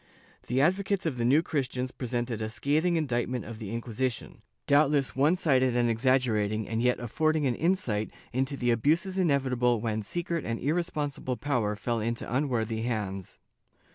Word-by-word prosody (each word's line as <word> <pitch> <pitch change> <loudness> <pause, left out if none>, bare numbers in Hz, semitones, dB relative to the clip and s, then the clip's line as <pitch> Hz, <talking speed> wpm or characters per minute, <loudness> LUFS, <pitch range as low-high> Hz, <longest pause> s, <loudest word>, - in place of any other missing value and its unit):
The 130 +2 +1
advocates 190 +4 +1
of 150 -6 -1
the 115 - +1
New 145 +7 +4
Christians 130 -4 -2
presented 120 -3 -3
a 110 - -2
scathing 150 +10 +1
indictment 125 -6 -1
of 110 -1 -8
the 105 -4 -6
Inquisition, 120 +1 -3 0.2
doubtless 145 -1 +3
one 145 +6 +4
sided 130 -8 +2
and 120 -1 +3
exaggerated 110 -3 +1
and 115 +2 -2
yet 125 0 +2
affording 155 +5 0
an 130 - +2
insight 120 - 0 0.2
into 135 +2 -1
the 120 -2 +1
abuses 165 - +1
inevitable 130 -7 +2
when 110 -1 -2
secret 170 - -3
and 115 0 -3
irresponsible 145 -4 -2
power 120 -8 0
fell 115 +2 -2
into 115 +2 -2
unworthy 115 -5 0
hands. 105 -5 -3
125 Hz, 155 wpm, -28 LUFS, 115-150 Hz, 0.2 s, New